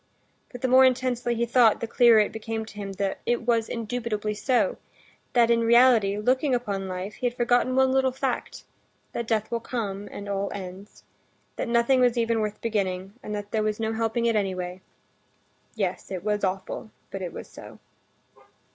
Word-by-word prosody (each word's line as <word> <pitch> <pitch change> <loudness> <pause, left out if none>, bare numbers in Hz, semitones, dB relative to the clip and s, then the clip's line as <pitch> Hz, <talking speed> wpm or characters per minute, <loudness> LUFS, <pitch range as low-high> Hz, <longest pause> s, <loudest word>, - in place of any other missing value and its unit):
But 245 - -9
the 260 - +1
more 260 +1 +7
intensely 250 -2 +1
he 235 +1 0
thought, 235 -2 +4
the - - -2
clearer 235 -1 +5
it 210 -1 +3
became 220 0 -4
to 220 - -12
him 200 -1 -5
that 195 0 -2
it 240 0 0
was 230 -2 +1
indubitably 225 -2 -3
so, 260 - +1 0.6
that 235 -1 +4
in 230 0 +3
reality, 230 -3 +5
looking 255 +5 +2
upon 200 -5 -3
life, 185 +2 -5
he 250 - -2
had 240 - -4
forgotten 245 +1 +2
one 265 0 +4
little 265 0 +2
fact—that 255 -2 -6
death 220 -2 0
will 235 - 0
come, 205 -4 -4
and 205 - -7
all 200 0 -2
ends; 190 +1 -9 0.5
that - - -3
nothing 235 +3 +3
was 245 -1 +3
even 230 -1 +1
worth 210 -1 -3
beginning, 195 -4 -2
and 210 - -5
that 205 0 -6
there 220 - +1
was 215 0 -1
no 220 0 -1
helping 225 +1 -1
it 230 -1 +2
anyway. 185 -3 -2 0.9
Yes, 195 -5 -3
it 185 -2 -5
was 210 0 -1
awful, 190 +3 -3 0.2
but 195 - -5
it 180 -2 -4
was - - -8
so. - - -12
225 Hz, 180 wpm, -26 LUFS, 205-240 Hz, 0.9 s, more